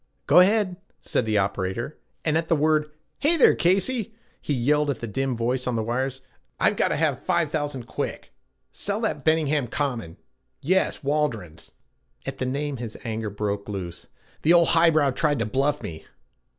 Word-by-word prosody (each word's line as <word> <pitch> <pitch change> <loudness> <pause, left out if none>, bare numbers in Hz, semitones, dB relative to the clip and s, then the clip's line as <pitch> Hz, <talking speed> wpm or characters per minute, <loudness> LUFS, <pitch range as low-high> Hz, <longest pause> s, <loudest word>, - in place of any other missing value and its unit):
'Go - - +6
ahead,' 190 -1 +3 0.2
said 115 - -1
the 110 -1 +2
operator, 100 +7 -1 0.3
and, 155 -1 +2
at 165 0 0
the 165 - +3
word, 155 0 +2 0.3
'Hey 330 +4 +3
there, 285 - +6
Casey,' 215 +5 +1 0.3
he - - -4
yelled 145 +3 +2
at 135 - -2
the - - -4
dim 130 +3 -2
voice 125 +2 -1
on 125 - 0
the 110 - 0
wires, 130 +3 -2 0.4
'I've - - +3
gotta - - +1
have - - 0
five - - 0
thousand 145 -5 -2
quick! - - -5 0.4
Sell 205 +1 -3
that 155 - -2
Benningham 155 -4 +2
Common 115 - -3 0.4
yes, 185 +2 +1
Waldron's.' 130 - -2 0.6
At - - -5
the 130 - -1
name 140 +1 -2
his 115 -2 -6
anger 110 -2 -3
broke 100 0 -3
loose. 90 -4 -6 0.3
'The 165 - +5
old 170 -1 +5
high 165 0 +6
brow 150 -4 +3
tried 145 +2 +1
to 115 - 0
bluff 135 +6 0
me. 80 -1 -8
140 Hz, 175 wpm, -25 LUFS, 115-155 Hz, 0.6 s, Go